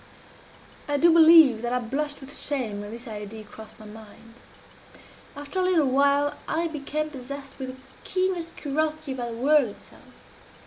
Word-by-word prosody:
I 290 Hz, 0 st, 0 dB
do 335 Hz, +3 st, +5 dB
believe 320 Hz, -8 st, +7 dB
that 240 Hz, 0 st, -2 dB
I -, -, +2 dB
blushed 280 Hz, +5 st, -3 dB
with 275 Hz, +2 st, -8 dB
shame 235 Hz, -8 st, -3 dB
when 205 Hz, -, -8 dB
this 235 Hz, +3 st, -9 dB
idea 215 Hz, 0 st, -7 dB
crossed 215 Hz, +1 st, -13 dB
my 215 Hz, -, -12 dB
mind. 220 Hz, +1 st, -14 dB, 1.0 s
After 290 Hz, +6 st, -5 dB
a -, -, +2 dB
little 360 Hz, -5 st, +3 dB
while 280 Hz, +2 st, +2 dB
I 335 Hz, +1 st, 0 dB
became 305 Hz, -1 st, -3 dB
possessed 275 Hz, 0 st, -8 dB
with 265 Hz, -, -4 dB
the 260 Hz, 0 st, -10 dB, 0.2 s
keenest 370 Hz, -3 st, -2 dB
curiosity 310 Hz, 0 st, -2 dB
about 250 Hz, -2 st, -4 dB
the 230 Hz, -, -7 dB
whirl 285 Hz, +1 st, +4 dB
itself. 205 Hz, -, -15 dB
280 Hz, 165 wpm, -25 LUFS, 235-305 Hz, 1.0 s, believe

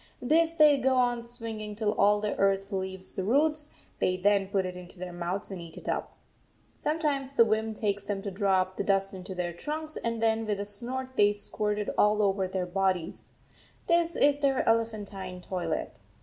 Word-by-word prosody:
This 325 Hz, +5 st, +2 dB
they 300 Hz, -3 st, +6 dB
go 265 Hz, 0 st, +2 dB
on 245 Hz, -2 st, +2 dB
swinging 225 Hz, -3 st, -6 dB
till 210 Hz, -1 st, 0 dB
all 205 Hz, +1 st, +4 dB
the 210 Hz, -1 st, -1 dB
earth 195 Hz, +1 st, +1 dB
leaves 190 Hz, -1 st, -3 dB
the 190 Hz, -, -3 dB
roots; 295 Hz, +7 st, +2 dB, 0.3 s
they 185 Hz, -, +1 dB
then 200 Hz, +1 st, +2 dB
put 195 Hz, -1 st, 0 dB
it 180 Hz, 0 st, -5 dB
into 180 Hz, +2 st, -10 dB
their 180 Hz, 0 st, -6 dB
mouths 175 Hz, +4 st, -3 dB
and 185 Hz, -3 st, -5 dB
eat 165 Hz, -1 st, -10 dB
it -, -, -10 dB
up. -, -, -3 dB, 0.6 s
Sometimes 295 Hz, -3 st, -1 dB
the 230 Hz, -, +6 dB
whim 220 Hz, 0 st, 0 dB
takes 205 Hz, -1 st, -1 dB
them 200 Hz, -1 st, -3 dB
to 200 Hz, -, -4 dB
draw 190 Hz, -1 st, +2 dB
up 185 Hz, 0 st, -5 dB
the -, -, 0 dB
dust 195 Hz, -1 st, +1 dB
into 185 Hz, 0 st, -7 dB
their 175 Hz, -1 st, -2 dB
trunks, 310 Hz, -, -5 dB
and 230 Hz, -1 st, -2 dB
then 225 Hz, 0 st, +1 dB
with 205 Hz, -2 st, -1 dB
a 200 Hz, -, -2 dB
snort 245 Hz, +6 st, -4 dB
they 205 Hz, 0 st, +5 dB
squirt 210 Hz, 0 st, 0 dB
it 210 Hz, -, -2 dB
all 210 Hz, 0 st, +4 dB
over 195 Hz, -1 st, +1 dB
their 185 Hz, -1 st, -2 dB
bodies; 185 Hz, -2 st, -1 dB, 0.6 s
this 340 Hz, -1 st, +2 dB
is 290 Hz, 0 st, +4 dB
their 275 Hz, -2 st, +1 dB
elephantine 210 Hz, -5 st, -1 dB
toilet. 175 Hz, -3 st, -4 dB
205 Hz, 195 wpm, -28 LUFS, 190-245 Hz, 0.6 s, they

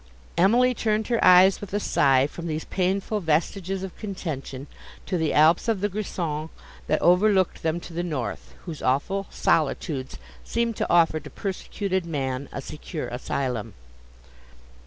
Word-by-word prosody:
Emily 240 Hz, +8 st, +4 dB
turned 220 Hz, -1 st, -1 dB
her 235 Hz, -2 st, +1 dB
eyes 185 Hz, +1 st, +7 dB
with 205 Hz, -1 st, -5 dB
a -, -, +2 dB
sigh 135 Hz, -8 st, +3 dB
from 170 Hz, +3 st, -6 dB
these 155 Hz, 0 st, -3 dB
painful 195 Hz, +3 st, -1 dB
vestiges 185 Hz, +3 st, -1 dB
of 190 Hz, -, -6 dB
contention, 155 Hz, -, -5 dB, 0.4 s
to -, -, -2 dB
the 160 Hz, -3 st, +1 dB
Alps 160 Hz, +8 st, +4 dB
of 225 Hz, -4 st, +1 dB
the 205 Hz, +2 st, 0 dB
Grison, 170 Hz, -6 st, -3 dB, 0.4 s
that 155 Hz, -, +2 dB
overlooked 185 Hz, +1 st, +3 dB
them 165 Hz, +1 st, 0 dB
to 170 Hz, -, -10 dB
the 170 Hz, -, -2 dB
north, 145 Hz, -11 st, -4 dB
whose 165 Hz, -5 st, -7 dB
awful 190 Hz, +10 st, 0 dB
solitudes 145 Hz, -3 st, 0 dB, 0.3 s
seemed 235 Hz, -, -1 dB
to -, -, -1 dB
offer 165 Hz, -2 st, +4 dB
to 150 Hz, 0 st, -11 dB
persecuted 190 Hz, -1 st, -3 dB
man 135 Hz, -3 st, -3 dB
a 135 Hz, -, -6 dB
secure 155 Hz, +2 st, -6 dB
asylum. 120 Hz, -3 st, -3 dB
170 Hz, 150 wpm, -25 LUFS, 150-195 Hz, 0.4 s, eyes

